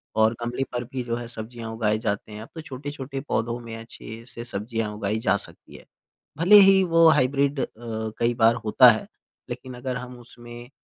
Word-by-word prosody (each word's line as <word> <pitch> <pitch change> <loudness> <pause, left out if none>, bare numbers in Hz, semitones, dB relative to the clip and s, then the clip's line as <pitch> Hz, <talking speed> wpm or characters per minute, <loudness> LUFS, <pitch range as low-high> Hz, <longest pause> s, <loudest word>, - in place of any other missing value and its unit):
और 110 +1 +4
गमले 120 +3 -2
पर 120 - -2
भी 125 +1 -5
जो 120 -1 -2
है 120 0 -6
सब्ज़ियाँ 115 0 -7
उगाए 110 -1 +1
जाते 105 -1 -3
हैं। 105 0 -8
अब 110 - -11
तो 160 - -6
छोटे-छोटे 135 -1 -6
पौधों 115 +2 -1
में 115 -1 -8
अच्छे 115 0 -10
से 115 -1 -6
सब्ज़ियाँ 110 -1 -3
उगाई 105 +1 -2
जा 100 -2 +2
सकती - - -9
हैं। - - -13 0.5
भले 180 +6 +6
ही 195 -1 +7
वो 165 -2 +5
हाइब्रिड 140 0 +2
अ, - - +1
कई 115 0 -2
बार 115 -1 +4
होता 125 +4 +7
है। 110 - -3 0.4
लेकिन 125 +1 -7
अगर 125 0 -3
हम 125 0 -8
उसमें 120 0 -12
120 Hz, 195 wpm, -25 LUFS, 110-130 Hz, 0.5 s, ही